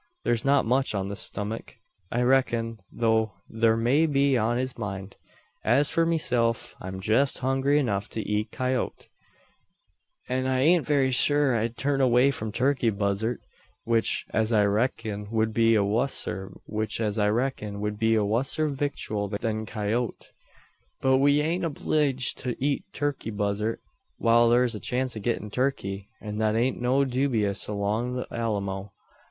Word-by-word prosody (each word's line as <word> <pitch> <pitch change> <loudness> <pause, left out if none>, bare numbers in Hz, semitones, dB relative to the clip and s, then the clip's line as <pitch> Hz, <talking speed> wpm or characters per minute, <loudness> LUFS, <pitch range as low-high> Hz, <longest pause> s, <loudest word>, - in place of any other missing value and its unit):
Thur's 115 -1 +1
not 140 0 +3
much 130 0 +1
on 100 0 -2
his 100 - -2
stummuk, 105 +5 -1 0.4
I 120 +1 +1
reck'n, 120 -3 +1
though 110 -2 +1 0.2
thur 115 0 +3
may 135 +8 +3
be 140 -2 +2
on 120 0 +1
his 130 0 -3
mind. 100 -3 -6 0.5
As 135 +6 +3
for 165 0 +2
meself, 120 -7 0
I'm 95 +1 -6
jest 110 +8 +2
hungry 135 +2 +2
enough 105 -8 -1
to 110 - -4
eat 105 +1 -1
coyoat; 130 0 -2 1.2
an 130 +1 -1
I 130 -1 +1
ain't 165 +3 +4
very 140 -3 +2
sure 145 +1 +4
I'd 115 +1 -1
turn 140 -1 0
away 130 +1 +4
from 110 -5 -4
turkey 125 +1 +1
buzzart; 100 +3 -1 0.4
which, 115 -1 +1
as 110 +1 0
I 105 -2 +4
reck'n, 105 -1 -1
wud 110 0 0
be 115 0 +4
a 105 - +3
wusser 100 -3 -1 2.2
victual 135 -7 -2
than 110 +2 -3
coyoat. 110 +3 -3 0.7
But 130 0 +3
we 145 +1 +4
ain't 165 +4 -1
obleeged 145 -4 0
to 125 -1 -3
eet 140 +1 -1
turkey 145 -5 -3
buzzart, 105 +1 -2 0.4
whar 115 0 +4
thur's 120 0 +3
a 105 - -5
chance 125 +1 -2
o' - - -4
gettin' 105 -1 -2
turkey; 100 -6 -2
an 105 0 -5
thet 110 0 +1
ain't 120 +2 0
so 130 +3 +2
dewbious 120 -6 0
along 105 +4 -1
the 125 - -3
Alamo. 100 -3 -3
115 Hz, 145 wpm, -26 LUFS, 105-130 Hz, 2.2 s, ain't